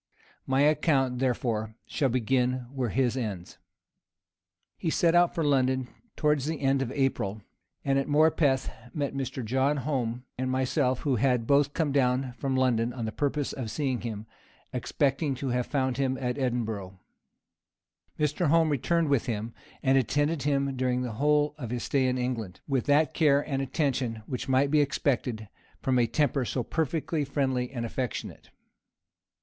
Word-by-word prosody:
My 130 +1 +2
account, 145 -4 +2
therefore, 115 -4 -1
shall 140 -4 0
begin 125 +1 +1
where 130 -4 -1
his 125 +1 +1
ends. 105 -9 -5 1.2
He 165 - -2
set 165 +1 +3
out 175 0 +4
for 165 - 0
London 130 -3 +2 0.3
towards 150 -3 +1
the 160 -1 -2
end 135 -1 +2
of 130 -2 -2
April, 110 -7 -1 0.4
and 135 0 +3
at 135 - -2
Morpeth 150 -3 +3 0.2
met 145 -3 -1
with 135 -1 -2
Mr. 130 - -6
John 135 +5 +1
Home 125 -3 -2 0.2
and 130 0 -1
myself, 130 0 +1
who 135 -4 +1
had 125 -1 +2
both 140 +2 +3
come 160 -4 +1
down 130 -1 +1
from 135 +1 -2
London 120 -3 +2
on 120 -2 -4
purpose 145 +3 -1
to 130 -4 -5
see 135 +2 -1
him, 110 -3 -5 0.5
expecting 140 0 0
to 135 +1 -3
have 125 0 0
found 130 -3 0
him 130 -1 0
at 125 -1 -1
Edinburgh. 110 -7 -2 1.2
Mr. 150 +3 +1
Home 165 +1 +4
returned 160 +4 +1
with 140 -3 +1
him, 115 0 -3 0.3
and 135 -1 +4
attended 145 +4 0
him 140 -1 0
during 125 -1 0
the 125 - -3
whole 150 +5 +2
of 120 -5 -5
his 120 0 -3
stay 135 -2 +1
in 125 0 0
England, 115 -7 -3
with 135 -2 0
that 145 +2 +3
care 145 -3 +3
and 135 -2 -1
attention 130 -5 -1
which 125 +2 -5
might 135 +2 +3
be 150 -1 +5
expected 125 -6 -1 0.3
from 130 -2 +1
a 120 - +3
temper 140 +2 +1
so 125 +1 -2
perfectly 160 +2 -1
friendly 130 -3 -1
and 120 -3 -3
affectionate. 125 +1 -5
130 Hz, 165 wpm, -28 LUFS, 125-145 Hz, 1.2 s, be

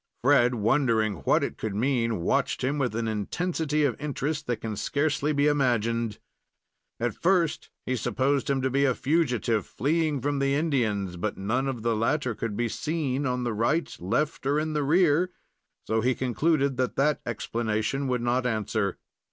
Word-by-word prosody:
Fred, 125 -2 +4
wondering 115 -3 +2
what - - +3
it - - -4
could 110 -3 -3
mean, 115 -3 0
watched - - 0
him 140 +3 0
with 125 -5 -1
an 115 0 -1
intensity 150 - -1
of 135 -5 +1
interest 150 +1 -3
that 120 -2 0
can 110 -1 -5
scarcely 145 +5 0
be 145 -1 +2
imagined. 115 -6 +1 0.8
At 120 -1 0
first 175 -3 +1 0.2
he 130 - 0
supposed 135 +4 0
him 135 -2 +1
to 130 - +1
be 140 +2 +2
a 130 -3 +3
fugitive 125 - +1
fleeing 155 +3 0
from 145 +2 -1
the 140 0 +2
Indians; 110 - 0
but 100 +4 -3
none 120 +8 -1
of 125 -5 -4
the 115 -1 +1
latter 120 +3 0
could 105 -1 -4
be 120 - +1
seen 145 0 -2
on 125 0 -1
the 120 -2 -1
right, 120 +10 0
left 125 - -1
or 145 +2 +2
in 155 0 -2
the 150 - 0
rear 160 +1 +4
and - - -15 0.6
so 110 0 +1
he 125 +2 +2
concluded 140 +2 +1
that 130 -1 -1
that 150 +2 +2
explanation 115 +3 -2
would 125 -2 0
not 125 +1 +1
answer. 110 -3 -1
130 Hz, 175 wpm, -27 LUFS, 115-145 Hz, 0.8 s, Fred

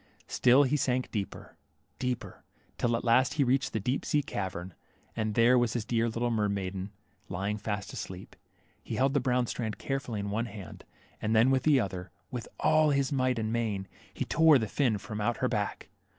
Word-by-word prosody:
Still 130 +3 +5
he 140 +2 +1
sank, 130 -2 0
deeper 100 -3 -5 0.2
— - - -43
deeper 125 -1 -3 0.2
— - - -36
till 120 -1 +2
at - - -6
last 125 +2 +3
he 145 - +3
reached 135 +2 +1
the 110 - -1
deep 125 +7 -1
sea 145 -1 +1
cavern, 95 -5 -4 0.4
and 110 -1 -1
there 120 +2 +5
was 120 -2 +1
his 120 -3 -2
dear 115 0 +1
little 120 +2 -1
mermaiden, 100 -3 -1 0.4
lying 100 +3 -2
fast 100 -2 -4
asleep. 95 +1 -7 0.5
He 115 - -4
held 135 +3 +2
the 145 - +3
brown 125 -1 +1
strand 110 -2 -3
carefully 130 -5 -3
in 100 0 -3
one 115 +3 -1
hand, 100 -6 -10 0.4
and 110 +1 +1
then 115 +4 +5
with 130 -1 +3
the 150 -3 +4
other, 95 -4 -3 0.2
with 125 -3 -5
all 155 0 +4
his 140 -1 +1
might 130 -2 +1
and 110 0 -1
main, 105 -5 -1 0.2
he - - -3
tore 160 -3 +6
the 110 -3 -1
fin 120 -2 +1
from 105 +2 -6
out 120 +3 0
her 130 - +1
back. 105 -5 -2
115 Hz, 200 wpm, -30 LUFS, 105-130 Hz, 0.5 s, tore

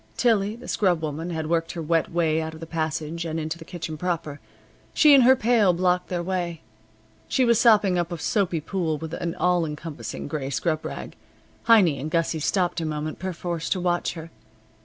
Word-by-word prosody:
Tillie, 215 -3 +2
the 235 - -12
scrubwoman, 165 -4 0
had 160 -2 -3
worked 165 +1 -1
her 170 - -5
wet 165 0 +1
way 160 -2 +1
out 160 0 -5
of - - -11
the 165 - -7
passage 160 0 -3
and 165 -1 -3
into 160 +2 -4
the - - -9
kitchen 165 -3 -6
proper. 160 -4 -3 0.6
She 300 -2 +7
and 270 -2 +7
her 260 +1 +7
pail 230 -6 +3
blocked 180 +1 +1
their 175 -1 -2
way. 175 -2 -3 0.7
She 255 - +2
was 235 -2 +4
sopping 210 -6 +4
up 175 0 -2
a 170 - -3
soapy 170 0 0
pool 165 -2 -2
with 160 +1 -7
an 170 -1 -3
all 180 -1 +2
encompassing 150 0 -6
gray 145 -2 -3
scrub 155 +3 -1
rag. - - -7 0.5
Heiny 190 -11 +5
and 150 +4 -4
Gussie 165 0 0
stopped 175 +2 0
a - - -2
moment 155 0 -4
perforce 175 -2 -4
to 190 - 0
watch 175 -1 0
her. 165 -1 -9
170 Hz, 195 wpm, -24 LUFS, 160-185 Hz, 0.7 s, She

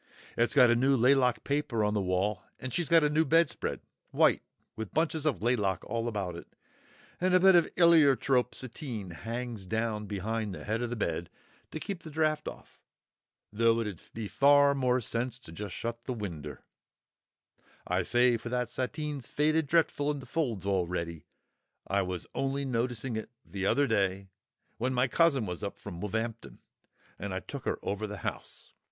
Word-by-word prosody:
It's 120 +5 +1
got 125 -4 +7
a - - +4
new 135 +3 +3
laylock 125 0 +3
paper 140 -6 0
on 105 0 +1
the 105 - +1
wall, 95 +2 0 0.2
and 130 -2 -5
she's 175 -3 0
got 165 -2 +6
a 150 - +3
new 155 +2 +3
bedspread, 165 +1 +1 0.3
white, - - +3 0.3
with 110 -2 -7
bunches 160 -1 +1
of 135 -8 -1
laylock 105 -7 +1
all 115 0 -2
about 100 -6 -3
it, 85 - -9 0.7
and 185 +1 +3
a - - +7
bit 190 0 +7
o' 175 - +8 0.2
eeliertrope 140 -7 +4
sateen 115 - -6
hangs 115 +3 -5
down 110 0 -2
behind 105 0 -3
the - - -9
head 110 +2 -1
of 120 - -2
the 120 - -3
bed 110 - -2 0.4
to 155 - -6
keep 195 +2 -5
the 160 - -9
draught 155 0 0
off, - - -10 0.7
though 115 +1 +3
it 115 - -1
'ud 100 -6 -6
be 110 -2 -4
far 140 +7 +5
more 130 -2 +1
sense 120 +2 -2
to 105 -3 -8
shut 115 +5 -5
the 130 - -2
winder, 85 -10 -6 1.2
I 90 +1 +1
say, 120 +5 +3
for 120 - -7
that 125 -1 -1
sateen's 140 +1 -4
faded 155 +1 +1
dretful 150 -2 +2
in 150 - 0
the 130 - -10
folds 125 - -2
already. 85 -4 -2 0.6
I 100 +1 +1
was 90 -2 -4
only 135 +1 -1
noticing 120 -1 -2
it 110 - -5 0.2
th'other 100 +9 +1
day, 100 -4 0 0.5
when 130 +2 0
my 125 +2 +3
cousin 140 -5 +3
was 90 -4 -5
up - - -5
from 85 0 -8
Woolv'ampton, 110 +2 -4 0.6
and 100 -1 -4
I - - -1
took - - -8
her - - 0
over 105 +2 -2
the 105 0 -6
house.... - - -6
120 Hz, 175 wpm, -30 LUFS, 105-140 Hz, 1.2 s, o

